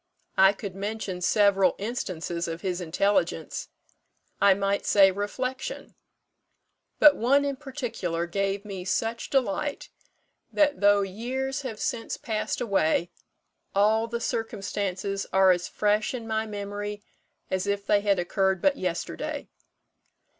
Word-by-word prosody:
I 190 +1 +7
could 200 -2 -7
mention 200 -2 -4
several 195 -1 +4
instances 175 -6 -3
of 165 0 -5
his 185 -1 -2
intelligence 170 - 0 0.7
I 200 -1 +6
might 200 0 0
say, 195 -2 +6
reflection; 255 - -4 1.0
but 300 -1 +8
one 275 +5 +3
in 280 -1 -1
particular 245 - -3
gave 195 +3 -2
me 195 -3 -6
such 225 +5 -2
delight 270 +3 -1 0.6
that, 295 -4 +2
though 205 0 +5
years 250 +8 -3
have 235 -6 -6
since 250 -7 -2
passed 215 -2 -2
away, 180 -6 +1 0.6
all 215 +3 +3
the 235 +1 -3
circumstances 200 -3 -3
are 190 -1 +6
as 175 -1 0
fresh 210 +3 +1
in 235 -2 -6
my 220 0 -1
memory 205 0 -5 0.5
as 190 0 -1
if 200 0 -1
they 205 0 +3
had 200 -1 +2
occurred 190 +1 +1
but 280 +5 +2
yesterday. 180 -2 -4
205 Hz, 125 wpm, -27 LUFS, 190-225 Hz, 1.0 s, but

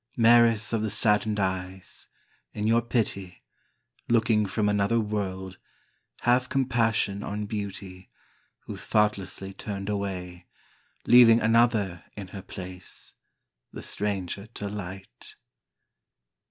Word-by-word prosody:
Maris 115 -2 +5
of 115 - +1
the 110 - -1
saddened 105 +1 +1
eyes, 95 -1 -4 0.5
In 105 - -2
your 115 +2 +4
pity, 105 -6 -3 0.7
Looking 110 -2 +3
from 105 +2 0
another 105 +2 +2
world 95 -3 -4 0.6
Have 125 +1 +2
compassion 115 -6 +1
on 105 +1 -4
beauty 100 -3 -6 0.5
Who - - -8
thoughtlessly 100 -2 -1
turned 100 0 -6
away, 90 -3 -4 0.6
Leaving 120 -2 +7
another 110 -5 +2
in 100 -3 -7
her 95 0 -8
place 90 -1 -10 0.6
The - - -9
stranger 100 -1 -3
to 100 - -4
light. 95 -1 -8
105 Hz, 105 wpm, -27 LUFS, 95-115 Hz, 0.7 s, Leaving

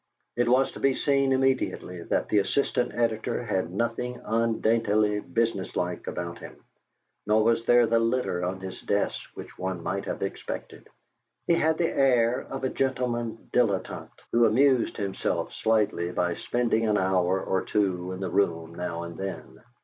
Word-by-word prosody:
It 120 0 +1
was 130 +2 +3
to - - -10
be 135 -1 +2
seen 140 -1 +2
immediately 130 -9 0
that - - -1
the 105 - +3
assistant 120 +4 0
editor 115 +1 0
had 95 -6 -1
nothing 120 +4 -2
undaintily 110 -2 +2
business 110 -3 -1
like 90 0 -2
about 85 0 -4
him, - - -10 0.7
nor 110 +1 +4
was 115 +1 +2
there 120 0 +6
the 115 0 +2
litter 115 -6 0
on 95 +1 -3
his 95 -1 -7
desk 100 0 0
which - - -10
one 95 -2 -3
might 95 +3 -2
have - - -3
expected. 95 - -6 0.6
He - - +3
had 160 -1 +2
the 170 - 0
air 125 -3 +3
of 135 0 -5
a 130 - +1
gentleman 120 -4 -2
dilettante 105 -6 -1
who 120 0 +5
amused 130 +2 +3
himself 100 -3 -2
slightly 105 -6 +1
by 90 0 0
spending 115 +2 0
an 105 -1 +3
hour 95 -1 +2
or 95 0 0
two 95 -3 -1
in 95 +1 -6
the 95 - -3
room 85 -4 0
now 85 -1 -4
and 85 0 -8
then. 95 +2 -6
110 Hz, 165 wpm, -27 LUFS, 95-120 Hz, 0.7 s, there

